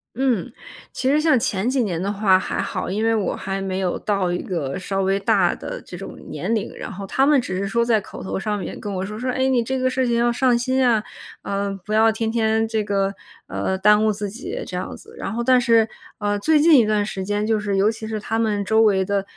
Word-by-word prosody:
嗯， 250 -3 0 0.4
其 260 - -3
实 295 +3 +3
像 305 -6 +4
前 225 -2 -1
几 260 -2 +1
年 175 -4 -2
的 200 +2 -1
话 195 -2 +3
还 - - -3
好， - - -3
因 215 +4 -1
为 225 - +3
我 210 -3 0
还 195 0 -4
没 190 -1 -3
有 185 -2 -1
到 195 -4 0
一 175 - -2
个 150 -8 -3
稍 195 +1 -2
微 195 +1 +1
大 195 - +2
的 - - -6
这 - - -9
种 - - -8
年 230 - -2
龄， 215 - -3
然 - - -7
后 195 +1 -7
他 270 +7 +2
们 295 -2 +5
只 185 -7 -4
是 200 - -2
说 235 +3 +1
在 225 -3 +2
口 - - -10
头 190 - -3
上 210 +1 -2
面 190 - -6
跟 205 - -5
我 190 0 -3
说， 210 +2 -7
说： 255 +1 -2
“哎， 260 +1 +1
你 250 -3 +2
这 265 +3 -2
个 255 0 +1
事 255 -1 0
情 235 - +1
要 240 0 +3
上 245 0 +2
心 260 +1 +1
啊， 225 -3 +3 0.4
呃， 200 0 -2
不 215 - -4
要 220 +1 +5
天 220 0 -2
天 220 -1 +1
这 220 -1 -1
个， 195 -1 0 0.3
呃， 190 - -2
耽 210 +2 +5
误 220 - +3
自 205 0 -4
己”， 350 - -6
这 - - -7
样 - - -4
子。 - - -16
然 - - -5
后 235 +2 -2
但 255 0 +4
是， 230 -2 +4 0.3
啊， 205 -1 -1
最 310 +7 +3
近 310 -3 +7
一 220 - +3
段 210 -1 +1
时 190 -2 -4
间， 205 +2 -1
就 220 -1 +1
是 200 -2 -1
尤 205 +3 +3
其 220 -1 -7
是 220 -1 -3
他 225 +2 -2
们 210 -3 0
周 220 +2 +3
围 195 -3 +3
的 200 -1 0
215 Hz, 280 characters per minute, -22 LUFS, 195-240 Hz, 0.4 s, 近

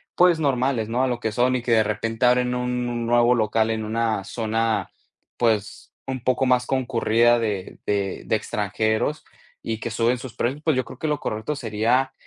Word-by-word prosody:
pues 175 -2 +5
normales, 130 -6 0
¿no? 120 +3 0
A 130 - +2
lo 120 -1 -2
que 110 - -1
son, 125 +3 +2
y 125 - -1
que 120 - -2
de 110 -1 +5
repente 115 +3 -1
abren 125 0 +3
un 125 0 -2
un 120 -1 -3
nuevo 120 +1 +4
local 110 0 +1
en 110 -1 -2
una 110 -2 -1
zona, 115 0 -1 0.5
pues 110 -4 -1
un 130 -2 -4
poco 130 +1 +1
más 125 -1 +3
concurrida 120 -2 +2
de 105 -5 -3
de 100 -2 -1
de - - +1
extranjeros 110 +6 -1 0.4
y 110 -1 -3
que 115 - -4
suben 115 +3 +1
sus 125 -1 -9
precios, 135 +6 -2
pues 155 -2 +1
yo 130 - +1
creo - - -12
que 155 - -2
lo 150 -2 0
correcto 110 +8 -3
sería, 120 +2 0
120 Hz, 195 wpm, -23 LUFS, 110-125 Hz, 0.5 s, pues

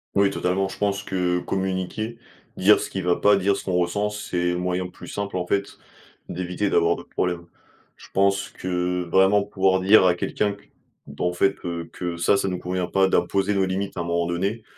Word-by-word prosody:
Oui 100 0 +4
totalement, 95 +2 0
je 95 - -9
pense 100 -1 -1
que 90 -2 0
communiquer, 95 +5 -3 0.4
dire 105 +3 +5
ce - - -4
qui 95 - -3
va 90 -1 +1
pas, 105 0 +5
dire 100 +1 +2
ce 100 - -7
qu'on 95 - -2
ressent, 90 +4 +1
c'est 90 -4 -2
le 90 - -2
moyen 90 0 -1
plus 90 -1 -13
simple, 100 -2 -4
en 90 - -2
fait, 100 +2 -2 0.5
d'éviter 90 +3 -2
d'avoir 85 0 +3
d'autres - - -12
problèmes. 90 -2 -2 0.5
Je - - -14
pense 100 0 +2
que 90 0 -2
vraiment, 95 +2 +4
pouvoir 95 -2 +1
dire 95 0 +6
à 90 - +4
quelqu'un 105 +3 -1
que, 100 - -16 0.4
ben 70 +4 -4
en 90 - 0
fait, 100 +2 +2
heu, 85 -1 -4
que 85 -1 -4
ça 85 +4 +3
ça 100 - -1
nous 90 -1 -2
convient 90 0 -3
pas, 95 +1 +3
d'imposer 95 +3 +1
nos 95 -1 +2
limites 95 +1 -3
à - - -1
un - - -2
moment 85 0 0
donné. 100 +6 -2
95 Hz, 210 wpm, -24 LUFS, 90-100 Hz, 0.5 s, dire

